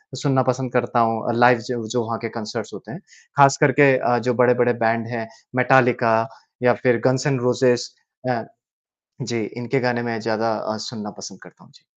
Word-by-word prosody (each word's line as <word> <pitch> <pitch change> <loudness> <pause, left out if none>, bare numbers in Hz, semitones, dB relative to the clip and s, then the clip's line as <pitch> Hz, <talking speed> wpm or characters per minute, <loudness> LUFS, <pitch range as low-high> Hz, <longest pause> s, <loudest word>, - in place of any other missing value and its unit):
सुनना 135 -3 +1
पसंद 130 0 -5
करता 120 0 0
हूँ 115 -1 +1
अ, - - +2
लाइव 120 +1 +5
जो 120 -3 -4
जो 120 +1 -1
वहाँ 115 0 -3
के 115 - -5
कंसर्ट्स 110 0 -6
होते - - -10
हैं। - - -9 0.4
ख़ास 140 -1 +6
करके 140 -1 +5
अ, 120 -1 +1
जो 125 +2 -1
बड़े-बड़े 120 0 +3
बैंड 115 0 0
हैं, 115 -1 -5 0.3
मेटालिका 125 -3 +3 0.5
या 125 -1 +5
फ़िर 120 -3 +2
गन्स 130 +2 +2
एंड 135 -4 0
रोज़ेज 125 0 +1 0.4
अ, 120 -3 -1 0.8
जी 115 -2 -3
इनके 120 +3 -1
गाने 125 -1 0
मैं 115 -1 -3
ज़्यादा 110 0 -1
अ, 110 0 -4
सुनना 105 -4 -7
पसंद 95 - -10
करता - - -19
हूँ। - - -23
जी। - - -22
120 Hz, 190 wpm, -21 LUFS, 115-125 Hz, 0.8 s, ख़ास